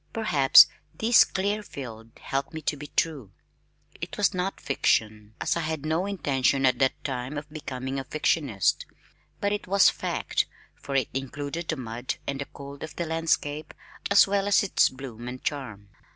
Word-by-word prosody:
Perhaps 155 -12 +7 0.3
this 230 +2 +6
clear 205 +3 -1
field 115 - -9
helped 135 +4 -3
me 160 - -4
to 150 - 0
be 145 +1 -8
true. 145 - -1 0.6
It - - -7
was 205 -1 +2
not 185 +1 -2
fiction, 110 -5 0
as - - 0
I - - -1
had 155 -2 -3
no 160 +5 0
intention 140 -8 +1
at 130 - +3
that 135 -1 +1
time 130 +1 -4
of 145 0 -6
becoming 135 -3 -4
a - - -4
fictionist, 140 - 0 0.5
but 200 - 0
it 205 - -4
was 195 +1 +5
fact, - - -1 0.3
for 140 - -7
it 130 -4 +1
included 145 +5 -4
the 155 - 0
mud 120 0 -4
and 140 0 -3
cold 140 0 -10
of 155 -2 -7
the 170 - -2
landscape 160 -2 -1 0.3
as 200 - +7
well 200 0 0
as 205 - +4
its 200 - +3
bloom 125 -3 -9
and 125 +1 -7
charm. 110 -9 -4
140 Hz, 170 wpm, -26 LUFS, 130-165 Hz, 0.6 s, Perhaps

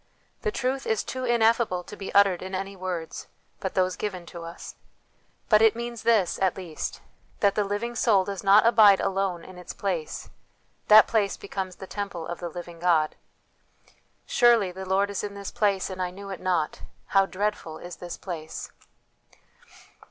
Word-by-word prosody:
The 435 - -1
truth 265 -5 -2
is 220 -2 +1
too 255 0 -4
ineffable 230 -5 +2
to 210 - -10
be 195 -2 -6
uttered 200 -3 +5
in 190 +1 -5
any 195 +1 -4
words 180 -3 -5 0.3
but 190 - -4
those 185 -1 +2
given 185 -4 -4
to 170 - -7
us. 165 0 -8 0.7
But 215 -1 +5
it 225 -1 +5
means 235 -1 -5
this, 220 -6 +2
at 190 -1 +1
least, 175 -5 -5 0.4
that 200 -1 +3
the 210 - +1
living 205 +4 -3
soul 210 -5 +3
does 200 0 -5
not 200 +3 +6
abide 215 -4 +7
alone 195 -3 -1
in 185 -1 -11
its 180 - -8
place; 180 -6 -4 0.6
that 215 0 +9
place 205 -3 0
becomes 190 -2 -5
the 190 - -9
temple 195 -4 -5
of 175 +1 -6
the 175 - -4
living 175 0 -9
God. 165 -3 +2 0.6
" - - -34
Surely 235 -6 +4
the 190 +1 -8
Lord 200 +1 +2
is 200 - -3
in 205 -1 -5
this 200 -1 -6
place, 205 -5 +1
and 185 0 -5
I 180 - -1
knew 195 +2 -9
it 190 - -6
not. 175 -5 0 0.3
How 195 -1 +4
dreadful 195 -5 -3
is 175 0 -9
this 175 -1 -7
place 160 -4 -7
195 Hz, 180 wpm, -26 LUFS, 180-210 Hz, 0.7 s, that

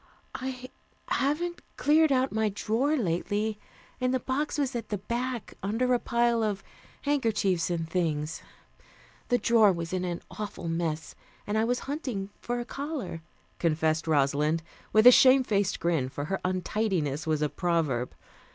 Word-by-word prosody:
"I 255 -1 -5 0.4
haven't 345 +6 0 0.2
cleared 310 +1 +4
out 260 0 +2
my 220 0 +1
drawer 235 +9 0
lately, 205 - -1 0.4
and 255 0 +1
the 260 - +1
box 275 +5 -2
was 275 -3 -1
at 230 -2 -4
the 205 - -1
back, 240 +3 -3
under 225 +6 +1
a 245 - +3
pile 235 -1 +1
of 205 -3 -1 0.4
handkerchiefs 220 - +1
and 165 -2 -2
things. 160 -3 -1 0.9
The 245 - +3
drawer 225 -2 +5
was 170 -1 -4
in 185 -1 -1
an 175 -1 -3
awful 205 -5 -6
mess, 165 -1 -2 0.3
and 205 - -2
I 220 +1 +3
was 245 +1 0
hunting 255 -9 -4
for 245 0 -3
a 240 - -4
collar," 275 - -5 0.4
confessed 160 -1 +1
Rosalind 150 +2 +2 0.3
with 215 +2 +5
a 250 - +12
shame 260 +1 +7
faced 200 -5 0
grin, 160 -7 0
for 145 +2 -5
her 195 +4 -2
untidiness 185 -5 -1
was 155 -1 +1
a - - +3
proverb. 155 -10 -1
210 Hz, 155 wpm, -28 LUFS, 165-250 Hz, 0.9 s, a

